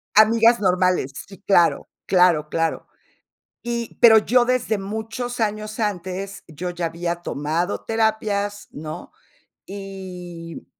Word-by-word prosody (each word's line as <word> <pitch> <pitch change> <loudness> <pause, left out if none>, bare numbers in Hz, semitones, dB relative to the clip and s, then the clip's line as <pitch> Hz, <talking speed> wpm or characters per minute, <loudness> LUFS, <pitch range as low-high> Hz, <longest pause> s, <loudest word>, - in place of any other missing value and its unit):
amigas 230 +2 +6
normales, 180 -7 +1
sí, 195 -1 -14
claro, 175 -4 +3 0.2
claro, 175 -5 +3
claro. 165 0 -1 0.8
Y, 235 -1 -4
pero 225 -2 +9
yo 245 +3 +3
desde 245 -4 0
muchos 220 +4 -5
años 215 +1 -2
antes 195 -1 -3
yo 170 +3 -5
ya 175 -1 -3
había 170 +1 -3
tomado 170 +2 -2
terapias, 215 -2 -1
¿no?, 155 +1 -8 0.6
y, 180 -4 -8
195 Hz, 110 wpm, -22 LUFS, 175-220 Hz, 0.8 s, pero